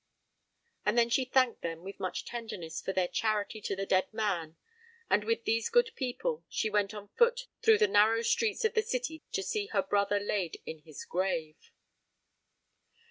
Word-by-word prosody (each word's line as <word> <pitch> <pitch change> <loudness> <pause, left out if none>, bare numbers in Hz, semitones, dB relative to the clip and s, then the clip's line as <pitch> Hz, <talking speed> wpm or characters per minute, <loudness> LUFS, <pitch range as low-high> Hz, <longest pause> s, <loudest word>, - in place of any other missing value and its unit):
And 210 +3 +1
then 235 0 +4
she 260 +2 +3
thanked 255 -2 +2
them 165 0 -4
with 195 +1 -8
much 185 - -3
tenderness 215 -9 -5
for - - -2
their 185 -2 +1
charity 215 +3 -1
to 195 - -2
the 195 +1 -3
dead 185 -1 +2
man; 190 -8 -2 0.5
and 210 - +4
with 230 +1 0
these 225 0 +1
good 480 0 +4
people 450 - -2
she 220 - -1
went 205 -1 +2
on 205 -1 -9
foot 480 - +3 0.2
through 445 -1 +6
the 435 0 +4
narrow 225 - +4
streets 445 - +1
of 445 - +2
the 440 - +3
city 315 - -3
to 390 - 0
see 425 -3 -2
her 435 - +1
brother 205 -5 +1
laid 200 -4 -2
in 160 - -6
his 150 -1 -10
grave. 170 -4 -2
215 Hz, 180 wpm, -31 LUFS, 190-265 Hz, 0.5 s, through